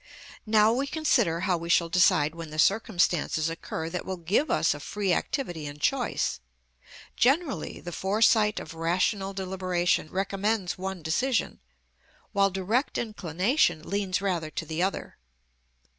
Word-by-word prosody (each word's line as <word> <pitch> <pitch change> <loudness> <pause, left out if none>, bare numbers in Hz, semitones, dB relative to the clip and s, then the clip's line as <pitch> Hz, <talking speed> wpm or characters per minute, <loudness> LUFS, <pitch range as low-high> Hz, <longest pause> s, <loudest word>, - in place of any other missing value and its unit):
Now 215 +1 +5
we 270 +3 -1
consider 235 - +1
how 180 -2 +1
we 170 +1 -7
shall 170 -1 +4
decide 160 -4 +3
when 165 -1 -8
the 155 - -8
circumstances 175 -4 +2
occur 160 0 -5
that 180 - -3
will 190 -1 -4
give 185 - 0
us - - +2
a - - -8
free 200 -4 -1
activity 175 - -2
and 145 +1 -9
choice. 250 - 0 0.8
Generally 275 +3 +1
the 175 - -7
foresight 210 +3 +2
of 160 - -9
rational 185 +4 0
deliberation 185 -4 -1
recommends 195 +1 -1
one 190 -2 -5
decision, 235 - 0 0.7
while 200 0 +3
direct 195 +8 -1
inclination 185 - 0
leans 200 -1 -1
rather 175 -5 -1
to 160 - -5
the 160 +2 -3
other. 190 - -3
190 Hz, 140 wpm, -27 LUFS, 170-215 Hz, 0.8 s, Now